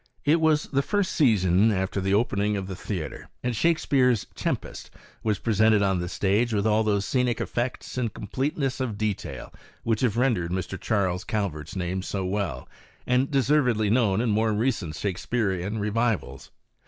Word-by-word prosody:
It 160 +3 +4
was 155 -1 +3
the 140 -1 0
first 205 +6 0
season 105 - +3
after 95 0 -1
the 95 +1 +2
opening 105 -2 +1
of 95 - -3
the 95 0 -6
theatre, 90 -3 -5
and 125 -1 -1
Shakspeare's 130 - +2
Tempest - - -4 0.3
was 105 -3 0
presented 110 -1 +3
on 95 -2 +1
the 90 0 -3
stage 105 +5 +1
with 100 0 0
all 110 0 +3
those 100 -2 +1
scenic 125 +2 0
effects 125 +1 -3
and 115 -3 -1
completeness 135 +5 -2
of 120 -6 -2
detail 110 -2 -4 0.3
which 115 -2 0
have 115 -4 +1
rendered 120 -10 +1
Mr. 95 +1 -4
Charles 95 -3 0
Calvert's 90 -9 -3
name 95 0 -2
so 95 0 -3
well 90 -9 -2 0.4
and 125 +2 +2
deservedly 130 -6 +2
known 110 -4 +3
in 120 -2 +1
more 110 +1 +2
recent 105 -9 -1
Shakspearian 100 +1 -2
revivals. 110 +1 -1
105 Hz, 160 wpm, -26 LUFS, 95-125 Hz, 0.4 s, It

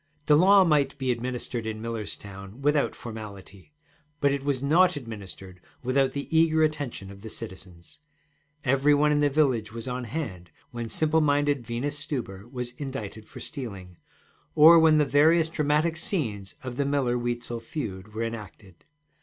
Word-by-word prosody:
The 150 - +5
law 190 +5 +7
might 150 -5 +2
be 130 -2 0
administered 120 -1 -3
in 110 -1 -4
Millerstown 105 -2 -7
without 145 +1 +1
formality, 105 -1 -10 0.5
but 140 -1 +3
it 140 -1 -2
was 140 -2 -1
not 175 +5 +4
administered 100 -7 -8 0.2
without 130 +1 +2
the 140 0 -4
eager 160 -1 +4
attention 145 -10 -2
of 100 0 -13
the 110 - -8
citizens. 95 -2 -10 0.6
Every 140 +2 +3
one 150 +1 +3
in 150 - +3
the 145 0 +3
village 130 -7 +1
was 115 +2 -7
on 125 0 -3
hand 100 - -5 0.2
when 120 -1 -5
simple 160 +5 +2
minded 145 -4 +1
Venus 140 +5 -3
Stuber 115 -8 -5
was 125 -2 -4
indicted 115 -6 -6
for - - -11
stealing, 100 - -7 0.6
or 165 +2 +9
when 160 -1 +5
the 150 - +4
various 160 +4 +4
dramatic 150 +1 +1
scenes 115 - -2
of 130 -1 -6
the 140 - +1
Miller 135 -3 +1
Weitzel 120 -1 -3
feud 110 -5 -6
were 115 - -1
enacted. 105 -5 -8
125 Hz, 160 wpm, -26 LUFS, 110-150 Hz, 0.6 s, or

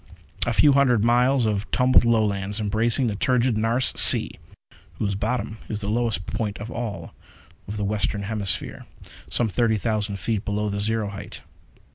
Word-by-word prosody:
A 120 - +1
few 145 +6 +5
hundred 125 -6 +3
miles 125 +2 +3
of 105 -1 -2
tumbled 130 -1 +3
Lowlands, 105 -3 0
embracing 110 +5 +1
the 110 -3 -1
turgid 125 +2 +1
Nares 115 +4 0
Sea, - - +6 0.6
whose 100 +3 -2
bottom 110 +2 -3
is 105 -1 -4
the 100 - -3
lowest 110 -5 -1
point 105 -1 -4
of 105 +3 -8
all 115 -4 -6 0.5
the 105 0 -4
Western 100 0 -2
Hemisphere 100 -3 -3 0.4
some 120 - +2
thirty 110 +1 +1
thousand 105 -2 -2
feet 100 +2 -2
below 105 -1 -2
the 100 0 -3
zero 110 0 -1
height. 100 0 -9
110 Hz, 155 wpm, -23 LUFS, 100-120 Hz, 0.6 s, Sea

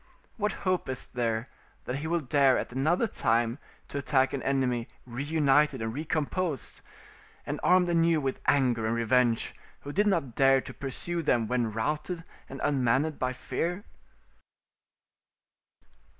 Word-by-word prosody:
What 210 -2 0
hope 185 -6 0
is 130 - -2
there 115 -1 -2 0.4
that 125 - -2
he 150 +3 -4
will 170 0 0
dare 135 -1 +3
at - - -4
another 155 - +2
time 115 - +1 0.3
to 140 - -3
attack 135 -1 +2
an 140 - -2
enemy 130 -3 0 0.2
reunited 145 +2 +2
and 110 0 -3
recomposed, 155 +1 -2 0.6
and - - -3
armed 180 0 +4
anew 165 -1 +3
with 135 -2 -2
anger 125 -5 +3
and 115 - 0
revenge, 115 0 +2 0.3
who 145 - -7
did 205 +5 +2
not 165 - 0
dare 135 +1 +5
to - - -8
pursue 170 +5 -3
them 120 -7 +2
when 120 -1 0
routed 150 +9 -2 0.3
and 135 - -7
unmanned 135 +3 +1
by 130 0 0
fear? 175 - -3
135 Hz, 140 wpm, -28 LUFS, 125-160 Hz, 0.6 s, dare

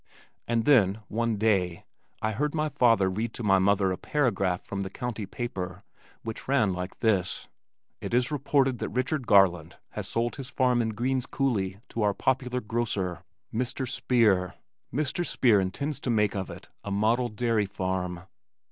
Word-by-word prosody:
And 115 -1 +1
then, 110 -7 +4
one 115 0 0
day, 95 -5 +1 0.4
I 110 - +1
heard 150 +8 -1
my 155 0 0
father 115 -7 +4
read 110 +5 -2
to 120 - -5
my 95 -2 +4
mother 95 0 +3
a 90 - -3
paragraph 100 -11 0
from 100 -1 -4
the 95 - -3
county 110 -1 -4
paper 95 -5 -5 0.4
which 115 -1 -6
ran 130 -8 +3
like 90 +1 -6
this, 100 -6 +1 0.5
"It - - -5
is 125 +3 +2
reported 135 -3 +1
that - - -3
Richard 130 +1 -1
Garland 95 -6 +4
has - - -5
sold 120 +1 -1
his 135 -2 -6
farm 125 -3 +2
in 115 - 0
Green's 130 +3 -1
Coulee 105 -8 -1
to 115 - -3
our 105 -1 +2
popular 125 -1 0
grocer, 105 -7 -2 0.3
Mr. 125 +3 -1
Speer. 105 - +2 0.4
Mr. 150 - -1
Speer 120 -10 +3
intends 130 +11 -2
to - - -4
make 105 -3 +2
of 95 -1 -3
it - - -10 0.2
a - - -5
model 110 +5 +1
dairy 110 -1 0
farm." 95 -2 -3
110 Hz, 165 wpm, -27 LUFS, 95-125 Hz, 0.5 s, then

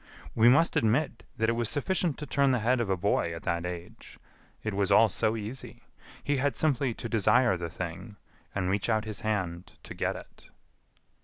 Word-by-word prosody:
We 115 +1 +6
must 145 +7 +4
admit 120 +3 +1 0.2
that 110 0 +1
it - - +3
was 115 -1 -1
sufficient 165 +2 0
to 150 - -6
turn 140 0 +2
the 130 - +3
head 125 0 +3
of 110 - -2
a 95 - +1
boy 85 -3 0
at 85 - -9
that 85 +1 -1
age. 90 -1 -9 0.5
It 110 - -2
was 100 0 0
all 110 +2 +6
so 110 +2 0
easy. 120 +3 -7 0.4
He 145 -1 0
had 140 +2 0
simply 135 -5 +1
to - - -5
desire 115 +1 +3
the 85 -1 -4
thing, 90 +5 -6 0.4
and 95 -2 -1
reach 100 +4 0
out 110 -1 +1
his 110 -1 -4
hand 95 -6 -3
to - - -8
get - - -1
it." - - -13
110 Hz, 200 wpm, -29 LUFS, 95-125 Hz, 0.5 s, We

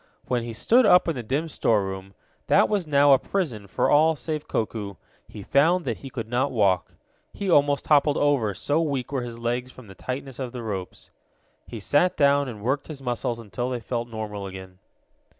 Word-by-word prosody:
When 125 -1 0
he 115 0 -5
stood 225 - +3
up 180 -3 +6
in 165 - +1
the 125 - -3
dim 140 +8 -2
storeroom, 95 - -1 0.3
that - - +5
was 200 -6 -1
now 145 -1 +5
a 135 - +5
prison 130 - -3
for - - 0
all 160 +2 +4
save 155 0 -4
Koku, 105 -3 -3 0.3
he 105 - -10
found 165 - +3
that 115 -4 -2
he 135 - -9
could 115 -4 -5
not 125 +4 0
walk. 100 -7 +1 0.4
He 200 -3 -2
almost 145 -2 +3
toppled 145 -1 +3
over, 130 -9 +1
so 145 - 0
weak 140 -6 -2
were 135 -3 -1
his 120 -1 -6
legs 120 +2 -2
from 130 - -14
the 95 - -12
tightness 130 +5 -6
of 130 -2 -4
the 120 -2 -6
ropes. 95 -4 -6 0.6
He 115 - -7
sat 145 - +2
down 140 -1 +3
and 110 -5 -8
worked 135 +4 -1
his 155 -3 -7
muscles 120 -1 -2
until 120 +2 -4
they 125 -1 -2
felt 120 +1 -3
normal 105 -3 -5
again. 95 -1 -10
125 Hz, 200 wpm, -25 LUFS, 110-145 Hz, 0.6 s, up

